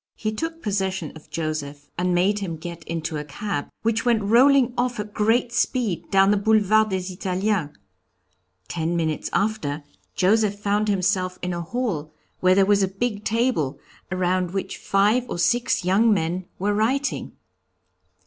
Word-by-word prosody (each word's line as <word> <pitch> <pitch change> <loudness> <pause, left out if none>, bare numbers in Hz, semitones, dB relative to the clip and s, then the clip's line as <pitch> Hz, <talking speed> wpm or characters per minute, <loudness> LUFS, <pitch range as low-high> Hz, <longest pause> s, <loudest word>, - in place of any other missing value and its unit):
He 215 - -2
took 325 +9 -5
possession 190 -5 -1
of 155 - -14
Joseph 150 -3 -4
and 180 0 0
made 195 +4 +2
him 180 -5 -4
get 170 +1 -8
into 165 -1 -3
a 150 - -4
cab, 150 +1 -4
which 230 0 +1
went 235 -4 +2
rolling 250 +4 +5
off 245 -2 -1
at 210 0 -5
great 230 +3 +2
speed 240 -6 0
down 195 0 +5
the 210 - +3
Boulevard 215 +1 +3
des 185 -1 -3
Italiens. 185 -2 -1 1.0
Ten 165 - -2
minutes 160 -2 -1
after, 165 -9 -1 0.3
Joseph 205 +2 +2
found 205 +1 0
himself 185 -2 0
in 180 0 -1
a 170 - -3
hall 165 -6 -3 0.2
where 185 0 +4
there 195 0 +5
was 200 0 +3
a 190 - +3
big 205 +2 -3
table, 225 - 0 0.3
around 185 0 0
which 195 - -3
five 210 +6 +2
or - - -3
six 235 +1 +1
young 210 +5 +4
men 180 -1 0
were 205 +2 0
writing. 255 +7 0
195 Hz, 160 wpm, -23 LUFS, 175-220 Hz, 1.0 s, rolling